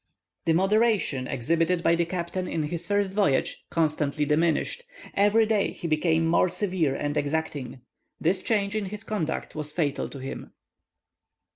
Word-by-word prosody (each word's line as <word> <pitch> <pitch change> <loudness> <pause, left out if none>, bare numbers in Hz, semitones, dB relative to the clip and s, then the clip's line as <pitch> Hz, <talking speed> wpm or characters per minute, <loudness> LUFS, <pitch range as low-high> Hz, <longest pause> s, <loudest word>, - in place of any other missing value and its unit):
The 165 - +3
moderation 195 - +2
exhibited 165 +7 0
by - - +4
the 170 0 +2
captain 180 +1 -3
in 160 - -1
his 170 +3 -4
first 205 -2 +1
voyage, 195 -10 +1
constantly 150 -2 0
diminished; 160 - +1 0.3
every 205 +3 +4
day 215 -2 +1
he 170 - -5
became 160 +1 +2
more 170 +2 +3
severe 180 -8 0
and 145 +1 -2
exacting. 145 -4 -2 0.4
This 175 +4 +1
change 205 -2 +1
in 215 -2 -1
his 210 +3 -6
conduct 200 -8 -3
was 150 -1 -4
fatal 150 -3 -1
to - - -9
him. 135 0 -7
170 Hz, 150 wpm, -26 LUFS, 150-200 Hz, 0.4 s, by